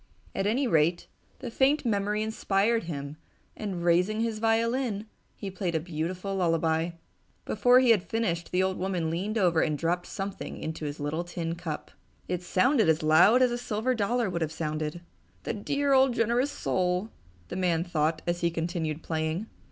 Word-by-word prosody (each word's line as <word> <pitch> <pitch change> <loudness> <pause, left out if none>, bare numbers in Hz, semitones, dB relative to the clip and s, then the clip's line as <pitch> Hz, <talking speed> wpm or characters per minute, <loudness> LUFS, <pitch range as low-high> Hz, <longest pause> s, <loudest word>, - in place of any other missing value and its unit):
At 195 - -1
any 255 +6 +1
rate, 165 -4 +2 0.4
the 245 -3 -5
faint 275 +4 +2
memory 210 -1 0
inspired 220 0 +1
him 145 -2 -5 0.4
and, 190 -5 -4
raising 180 +5 +2
his 225 -2 -1
violin, 225 -1 +1 0.3
he 200 -2 -6
played 185 -2 -2
a - - +2
beautiful 175 +4 -4
lullaby. 165 -1 +1 0.5
Before 245 +4 +5
he 255 -2 +5
had 215 -5 +4
finished 180 -6 -2
the 180 +1 +2
old 190 0 -1
woman 180 -4 -1
leaned 200 +7 -2
over 175 -5 +3
and 150 -1 0
dropped 175 +3 -1
something 195 0 -5
into 160 0 -5
his 145 +1 -5
little 150 +4 -2
tin 170 -1 -4
cup. 170 -3 -6 0.4
It 180 -1 -2
sounded 215 - +3
as 160 0 +2
loud 175 +11 +6
as 250 - +3
a 240 - -2
silver 240 +1 -1
dollar 235 +1 0
would 175 -2 -3
have 155 -1 -1
sounded. 155 0 -3 0.4
"The - - -2
dear 280 +6 0
old 265 -2 +4
generous 240 +4 +2
soul!" 180 -2 -1 0.4
the - - -5
old 185 - -2
man 170 -2 +2
thought 160 -2 -1
as 175 0 -1
he 170 - +2
continued 165 -2 -3
playing. 160 +4 -2
180 Hz, 175 wpm, -28 LUFS, 165-225 Hz, 0.5 s, loud